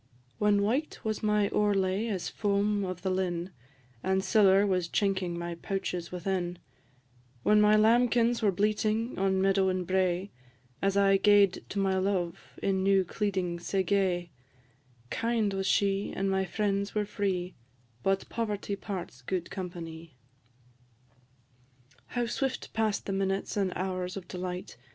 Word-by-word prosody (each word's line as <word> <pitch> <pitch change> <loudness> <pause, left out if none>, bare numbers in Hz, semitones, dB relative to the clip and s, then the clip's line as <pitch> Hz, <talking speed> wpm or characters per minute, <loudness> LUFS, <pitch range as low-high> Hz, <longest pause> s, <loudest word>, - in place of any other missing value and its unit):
"_ - - -41 0.4
When 205 -1 +3
white 260 +9 0
was 215 -1 -2
my 210 -1 +2
owrelay 200 0 +1
as 190 -5 -2
foam 205 0 0
of 185 -1 -5
the 190 - 0
linn, 180 -1 -1 0.5
And 190 +4 +1
siller 200 -2 +5
was 185 -3 +1
chinking 190 -2 0
my 170 0 -4
pouches 180 -1 -4
within; 180 -1 -2 0.9
When 210 0 +5
my 210 0 +6
lambkins 235 +2 +4
were 210 -2 +3
bleating 215 +4 0
on 190 0 +2
meadow 195 -1 +3
and 185 -1 -1
brae, 185 +1 0 0.5
As 195 0 +1
I 195 -1 +5
gaed 205 -2 +4
to - - -5
my 190 -1 +2
love 185 -3 -1 0.2
in 190 -1 +1
new 195 -1 +3
cleeding 185 -3 -2
sae 190 +2 0
gay 180 -3 0 0.8
Kind 230 -3 0
was 195 0 -1
she, 195 0 +1
and 195 0 0
my 190 0 +1
friends 200 +2 -1
were 210 -1 +1
free; 190 -3 -2 0.5
But 195 +5 0
poverty 210 -3 -3
parts 185 -10 -6
gude 170 +6 -3
companie. 165 -5 -7 1.9
How 245 -1 -1
swift 260 +3 -3
pass'd 220 -2 0
the 195 - -2
minutes 195 0 -1
and 195 -3 +1
hours 185 0 -3
of 180 -2 -8
delight! 180 0 -5
195 Hz, 145 wpm, -29 LUFS, 185-205 Hz, 1.9 s, my